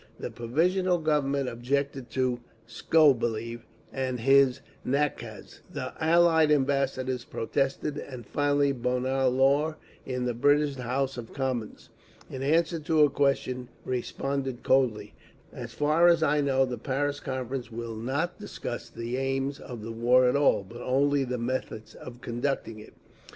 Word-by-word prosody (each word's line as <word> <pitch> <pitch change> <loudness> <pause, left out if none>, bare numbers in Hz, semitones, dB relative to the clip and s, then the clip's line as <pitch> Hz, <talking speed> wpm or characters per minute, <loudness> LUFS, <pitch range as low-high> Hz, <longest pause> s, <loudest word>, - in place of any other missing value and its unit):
The - - -5
Provisional 175 +10 +1
Government 140 -4 0
objected 130 +2 -2
to 125 0 0 0.3
Skobeliev 120 -5 +2 0.3
and 130 -2 -2
his 135 0 +4 0.2
nakaz; 140 +3 -3
the - - -5
Allied 165 -1 +5
ambassadors 135 -3 +1
protested 135 +6 -2
and 125 -3 -8
finally 145 -1 +1
Bonar 130 +1 0
Law 140 +5 +2 0.3
in 125 -1 -3
the 125 - 0
British 145 +3 +2
House 130 +2 -2
of 115 - -9
Commons, 130 -5 -3 0.4
in 130 - -6
answer 165 +4 +2
to 155 0 +3
a 145 - +4
question, 130 -3 0 0.2
responded 130 +1 -3
coldly, 115 -6 +1 0.4
"As - - -8
far 155 +4 +4
as 170 -2 +4
I 150 -1 +3
know 135 -1 +2
the 125 -2 -5
Paris 145 +1 -1
Conference 130 -2 -4
will 115 0 -5
not 135 +10 -2
discuss - - -6
the 115 +2 -4
aims 135 +1 -1
of 120 -4 -8
the 115 - -5
war 125 +3 +4
at 125 - +2
all, 140 -8 +3
but 115 +5 -11
only 140 +2 +2
the 125 0 -3
methods 115 -2 -4
of 120 0 -11
conducting 120 -2 -3
it…." 105 - -14
135 Hz, 140 wpm, -27 LUFS, 125-145 Hz, 0.4 s, Allied